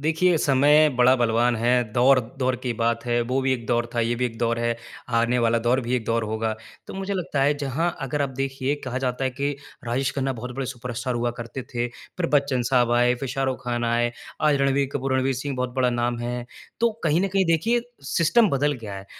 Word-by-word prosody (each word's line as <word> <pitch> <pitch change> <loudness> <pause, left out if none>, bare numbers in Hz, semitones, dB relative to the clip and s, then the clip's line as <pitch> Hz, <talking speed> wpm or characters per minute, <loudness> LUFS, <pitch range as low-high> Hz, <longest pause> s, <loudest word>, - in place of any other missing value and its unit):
देखिए, 160 +3 +2
समय 145 +2 +5
बड़ा 125 +1 +6
बलवान 120 0 +2
है। 120 -1 +1
दौर-दौर 130 +1 +2
की 125 -2 -1
बात 115 +1 +1
है, 120 0 +1
वो 125 +3 0
भी 130 0 +2
एक 120 -3 -3
दौर 120 -1 +1
था, 120 - +1
ये 115 +1 +1
भी 125 +1 -1
एक 115 -2 -8
दौर 115 0 0
है, 120 0 0 0.4
आने 120 +2 +2
वाला 115 -1 +2
दौर 125 +2 +3
भी 125 0 -2
एक 115 - -4
दौर 115 0 0
होगा। 110 +1 -1 0.3
तो - - -8
मुझे 195 +1 -3
लगता 160 -7 -1
है, 145 +2 +3
जहाँ 160 +6 -1
अगर 140 +2 -1
आप 140 - -1
देखिए 135 +1 -1
कहा 130 0 -3
जाता 125 +1 -1
है 130 - +1
कि 140 +3 -2 0.3
राजेश 130 +3 0
खन्ना 135 -1 -1
बहुत 125 +1 -7
बड़े 135 - -2
सुपरस्टार 125 0 -4
हुआ 120 0 0
करते 120 +2 -6
थे, 120 0 -3
फिर 170 +8 -6
बच्चन 140 -3 +2
साहब 125 -2 +3
आए, 120 +1 +4
फिर 130 +2 -5
शाहरुख 130 0 -2
ख़ान 120 -1 -1
आए, 120 +1 +1 0.3
आज 150 -2 +3
रणवीर 140 0 +2
कपूर, 135 -1 -1
रणवीर 130 +1 +1
सिंह 135 +2 -4
बहुत 125 0 -1
बड़ा 125 -1 +2
नाम 120 0 -1
है। 120 0 -3 0.4
तो 235 0 +4
कहीं 160 +2 +3
न 195 - +1
कहीं 195 0 +2
देखिए, 220 +9 +2 0.3
सिस्टम 195 +9 +4
बदल 145 +2 +1
गया 100 -2 -6
है। 95 0 -9
125 Hz, 225 wpm, -24 LUFS, 120-140 Hz, 0.4 s, बड़ा